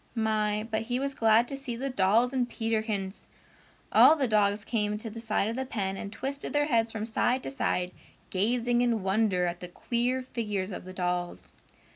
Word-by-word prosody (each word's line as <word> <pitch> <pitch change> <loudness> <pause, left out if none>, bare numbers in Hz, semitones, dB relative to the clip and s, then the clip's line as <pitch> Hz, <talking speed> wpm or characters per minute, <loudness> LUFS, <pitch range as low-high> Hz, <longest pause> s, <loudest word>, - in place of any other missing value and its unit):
My, 215 -1 0
but 220 0 0
he 245 +2 -2
was 275 +1 -1
glad 225 0 +4
to 275 - -5
see 270 -3 -4
the 270 +3 -3
dolls 230 +4 +3
and 250 -2 0
Peterkins! 220 -4 -2 0.6
All 315 - +8
the 275 -4 0
dogs 205 -1 +2
came 210 -2 -1
to 220 +1 -5
the 225 +1 -7
side 215 -2 0
of 225 - -2
the 265 - -2
pen 195 -7 -3
and 200 +1 -6
twisted 275 +5 -3
their 290 0 +3
heads 230 -5 +2
from 220 -1 -4
side 245 +3 0
to - - -5
side, 180 -9 -1 0.4
gazing 240 +5 +1
in 235 -4 +1
wonder 190 -2 +2
at 175 0 -3
the 180 - -7
queer 245 +7 -1
figures 210 -6 -3
of 180 - -7
the 185 - -8
dolls. 180 -1 -3
225 Hz, 195 wpm, -28 LUFS, 200-245 Hz, 0.6 s, All